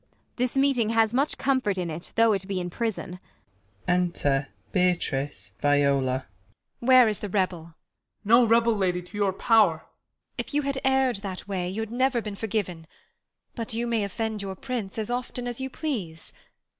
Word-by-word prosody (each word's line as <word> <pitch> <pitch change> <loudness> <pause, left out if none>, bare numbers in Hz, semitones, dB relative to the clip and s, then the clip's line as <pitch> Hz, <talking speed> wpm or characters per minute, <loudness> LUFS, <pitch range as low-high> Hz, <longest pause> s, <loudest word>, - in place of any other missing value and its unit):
This 250 +1 0
meeting 270 -5 +3
has 225 0 +3
much 275 +4 +1
com 265 -1 +2
fort 205 -5 -1
In 175 -3 -2
it 165 +3 -6
though 230 -1 +5
it 195 -1 -3
be 195 -2 -2
in 175 -1 -4
prison. 205 -4 -3 0.7
Enter 170 -6 +1 0.2
Beatrice, 145 - 0
Viola. 140 -3 +2 0.5
Beat. 240 - -6
Where 255 -2 +8
is 210 -2 -1
the 205 - -5
rebel 185 -3 0
1 - - -13
Ben. 165 - -18 0.5
No 235 +3 +6
rebel, 230 +1 +4
lady, 180 -3 0
to 180 - -14
your 200 -2 +2
pow'r. 195 -5 +3 0.5
Beat. - - -3
If - - -12
you 295 - +2
had 275 -1 -1
err'd 265 -3 +2
that 195 -1 -7
way 185 -3 -2
y'had 220 +3 -4
never 255 +1 +2
been 210 -3 -5
Forgiven; 195 -6 -3 0.7
but 225 -2 -4
you 235 +1 -1
may 230 -3 0
offend 220 +1 -3
your 195 -1 -5
Prince 230 -5 -5
As 220 +1 -3
often 245 0 -3
as 245 +1 -4
you 265 - -3
please. 205 - -5
210 Hz, 180 wpm, -26 LUFS, 180-240 Hz, 0.7 s, Where